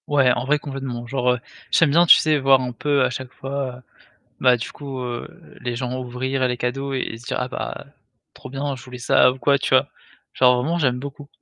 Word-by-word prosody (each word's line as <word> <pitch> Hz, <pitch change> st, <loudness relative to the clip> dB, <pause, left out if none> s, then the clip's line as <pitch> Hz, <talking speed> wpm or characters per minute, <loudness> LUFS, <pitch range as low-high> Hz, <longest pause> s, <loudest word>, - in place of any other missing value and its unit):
Ouais, 135 Hz, -3 st, +4 dB
en 125 Hz, -, -2 dB
vrai 150 Hz, +2 st, +3 dB
complètement, 135 Hz, -4 st, -6 dB
genre, 125 Hz, -1 st, +1 dB
heu, 125 Hz, -, -4 dB, 0.3 s
j'aime 165 Hz, -4 st, +4 dB
bien, 170 Hz, +4 st, +5 dB
tu -, -, +9 dB
sais, 155 Hz, -1 st, +2 dB
voir 135 Hz, -1 st, +5 dB
un 125 Hz, -1 st, -3 dB
peu 140 Hz, +2 st, +1 dB
à 130 Hz, -, +2 dB
chaque 130 Hz, +1 st, -6 dB
fois, 135 Hz, -2 st, -5 dB, 0.6 s
bah, 125 Hz, -1 st, +5 dB
du 120 Hz, -, -6 dB
coup, 140 Hz, -2 st, -7 dB
heu, 120 Hz, -1 st, -5 dB, 0.3 s
les 120 Hz, -1 st, -3 dB
gens 125 Hz, +1 st, -3 dB
ouvrir 130 Hz, +1 st, -2 dB
les 125 Hz, -, -1 dB
cadeaux 135 Hz, +3 st, -3 dB
et 125 Hz, -3 st, -3 dB
se 120 Hz, -, -15 dB
dire: -, -, -3 dB
«Ah 125 Hz, -, -2 dB
bah, -, -, -6 dB, 0.5 s
trop -, -, -11 dB
bien 140 Hz, +2 st, -3 dB
je 120 Hz, -, -12 dB
voulais 125 Hz, -1 st, -9 dB
ça» 125 Hz, +1 st, +4 dB
ou 130 Hz, -, -10 dB
quoi, 140 Hz, +3 st, +3 dB
tu -, -, -3 dB
vois? -, -, +4 dB, 0.5 s
Genre 125 Hz, -1 st, +5 dB
vraiment 155 Hz, +8 st, -1 dB
j'aime 130 Hz, -6 st, +1 dB
beaucoup. 140 Hz, +2 st, -8 dB
130 Hz, 225 wpm, -22 LUFS, 125-140 Hz, 0.6 s, tu